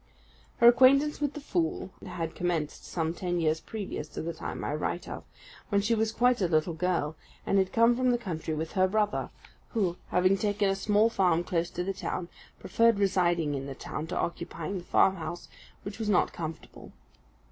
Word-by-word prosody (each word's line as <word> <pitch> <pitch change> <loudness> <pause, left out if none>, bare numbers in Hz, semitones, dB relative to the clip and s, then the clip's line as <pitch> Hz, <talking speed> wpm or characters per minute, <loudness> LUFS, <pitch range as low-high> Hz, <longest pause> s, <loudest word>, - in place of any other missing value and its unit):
Her 235 - +6
acquaintance 275 +5 +5
with 290 0 -1
the - - -4
fool 180 - -2
had 165 -1 -4
commenced 170 -4 -2
some 165 -1 -2
ten 175 -1 -2
years 160 -1 +1
previous 200 -8 -5
to - - -6
the 170 +1 -3
time - - -6
I - - -2
write 155 +3 -3
of, - - -7 0.4
when 200 - +3
she 215 +3 +1
was 220 0 +1
quite 245 0 +2
a 180 - +3
little 160 +1 +1
girl, 165 -2 -1 0.3
and 195 - +3
had 190 -1 +1
come 230 +1 +4
from 255 +1 +1
the 245 - +3
country 160 -7 -4
with 160 +1 -4
her 185 0 +3
brother, 210 +1 0 0.4
who, 190 -6 0
having 185 +2 +3
taken 205 -1 +1
a - - 0
small 210 +3 +2
farm 180 -5 +2
close 175 -2 -1
to 180 - -3
the 195 +2 -2
town, 180 -2 -4 0.3
preferred 230 -2 +3
residing 175 -6 +2
in 135 -1 -4
the 135 - -6
town 155 +3 -5
to - - -4
occupying 170 +2 -3
the 175 - -12
farmhouse, 175 -3 +1 0.4
which 200 +2 -7
was 220 -2 -2
not 195 - +2
comfortable. 160 -1 -8
185 Hz, 190 wpm, -29 LUFS, 165-210 Hz, 0.4 s, Her